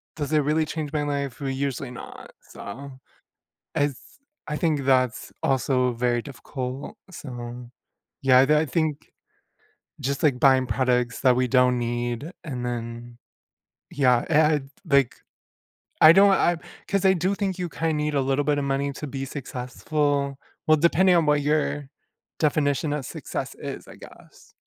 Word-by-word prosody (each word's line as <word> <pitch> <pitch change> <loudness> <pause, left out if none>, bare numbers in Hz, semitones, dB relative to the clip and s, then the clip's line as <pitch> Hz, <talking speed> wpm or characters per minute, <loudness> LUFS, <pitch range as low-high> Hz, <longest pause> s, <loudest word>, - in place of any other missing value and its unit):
does 150 -2 -4
it 155 - +5
really 150 +2 +1
change 155 -2 -4
my 150 -1 0
life? 140 -2 -3
Well, 140 - -2
usually 135 -1 -3
not, 125 - -10
so 130 +5 -10 0.8
as 145 -2 0 0.5
I 150 - -2
think 155 -4 +1
that's 130 -2 +1
also 125 -1 +1
very 120 0 0
difficult, 130 - -7
so, 120 -6 -8 0.5
yeah, 130 0 +6
th 150 +2 +4
I - - +3
I - - -2
think 155 0 -2 0.9
just 140 +1 -2
like, 140 -5 +3
buying 130 -1 +5
products 125 -2 0
that 130 -2 +5
we 125 0 +1
don't 125 0 +3
need 120 +5 -3
and 125 -5 -5
then 120 0 -5 0.7
yeah, 125 -4 +3
and, 150 -3 +3 0.2
like, 140 -6 +3 0.9
I 155 +1 +10
don't 195 +2 +6
I 175 -2 +3 0.3
'cause 200 0 0
I 190 - +7
do 185 +2 0
think 195 -2 -2
you 180 - -2
kinda 165 0 -1
need 150 0 -1
a 140 - +2
little 135 +2 0
bit 150 -1 +2
of 145 - -1
money 140 +1 -1
to 150 - -6
be 135 0 -4
successful 140 +2 -2 0.3
well, 155 0 +6
depending 180 +3 +4
on 165 -2 +3
what 150 -1 +3
your 145 -1 0 0.5
definition 145 0 +1
of 150 -2 -3
success - - -5
is, - - -7
I - - -12
guess. - - -16
140 Hz, 160 wpm, -25 LUFS, 125-150 Hz, 0.9 s, I